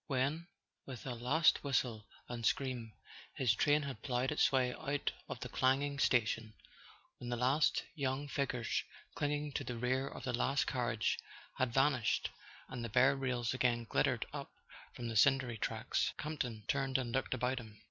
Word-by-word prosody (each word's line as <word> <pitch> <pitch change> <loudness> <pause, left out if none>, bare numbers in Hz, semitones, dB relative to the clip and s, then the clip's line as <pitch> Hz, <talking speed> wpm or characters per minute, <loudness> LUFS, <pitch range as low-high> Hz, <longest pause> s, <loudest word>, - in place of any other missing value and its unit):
When, 140 +5 0 0.4
with 130 -4 -7
a 130 - -2
last 130 +8 +3
whistle 120 -6 0 0.2
and 120 -1 -5
scream, 120 -3 0 0.4
his 125 -5 +3
train 145 +6 +3
had 135 -6 -6
ploughed 125 -1 0
its 150 - +3
way 130 -2 +2
out 140 +1 -2 0.2
of - - -5
the - - -3
clanging 140 +2 +1
station; 115 -4 +2 0.6
when 120 - -6
the 120 - 0
last 130 +6 +3
young 140 0 -2
figures 130 -4 -1 0.3
clinging 145 0 -1
to - - -2
the 125 - -4
rear 130 +3 0
of 130 - -8
the 125 -1 -2
last 135 +3 +2
carriage 120 -4 0 0.4
had 130 -2 +1
vanished, 135 -3 +2 0.4
and 125 -2 -5
the 115 - -3
bare 130 +5 +5
rails 125 -3 -1
again 120 -2 +1
glittered 115 - +1
up - - -6 0.4
from 120 - -4
the 115 - -4
cindery 125 -1 +4
tracks, - - 0
Campton 125 -8 -3
turned 135 -1 +1
and 125 -3 -2
looked 135 0 0
about 130 +1 0
him. 110 -3 -12
130 Hz, 170 wpm, -35 LUFS, 120-140 Hz, 0.6 s, bare